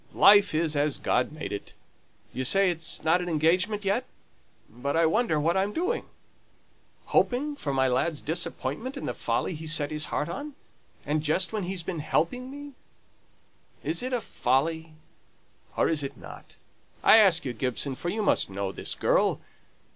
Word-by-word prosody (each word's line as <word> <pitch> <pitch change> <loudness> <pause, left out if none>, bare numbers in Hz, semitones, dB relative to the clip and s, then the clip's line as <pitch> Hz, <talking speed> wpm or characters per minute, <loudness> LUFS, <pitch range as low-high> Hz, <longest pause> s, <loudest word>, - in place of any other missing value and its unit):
life 205 -3 +6
is 160 -1 +1
as 145 0 +1
God 125 - +1
has 155 - -14
made - - -5
it. 100 - -7 0.6
You 130 - -3
say 195 +7 +4
it's 165 -1 -2
not 165 +3 +3
an 175 - -4
engagement 180 +6 +1
yet? 205 +6 +1 0.6
But 140 +6 -3
I 165 - +4
wonder 165 -1 +1
what 165 +4 +1
I'm 195 +2 0
doing? 370 +8 -1 1.0
Hoping 285 +4 +1
for 150 - -4
my 130 -1 +2
lad's 145 +5 0
disappointment 170 - -3
in - - -5
the - - -2
folly - - -2
he's 160 0 0
set 145 -1 -1
his 150 0 -1
heart 150 - -2
on 285 - -6 0.5
and 150 +2 0
just 160 +7 +1
when 210 -4 -2
he's 185 -1 -3
been 170 -1 -4
helping 250 - -1
me. 285 +1 -9 1.1
Is 165 +2 0
it 255 +1 -3
a 250 -2 0
folly, 160 +5 -1 0.8
or - - +3
is 155 -3 +1
it 140 -2 -6
not? - - -12 0.5
I - - +8
ask 190 -7 +5
you, 125 - -2
Gibson, 130 +3 -2
for 175 +6 -4
you 215 +3 -2
must - - +2
know 95 0 -3
this - - -3
girl. - - +2
165 Hz, 175 wpm, -27 LUFS, 150-205 Hz, 1.1 s, I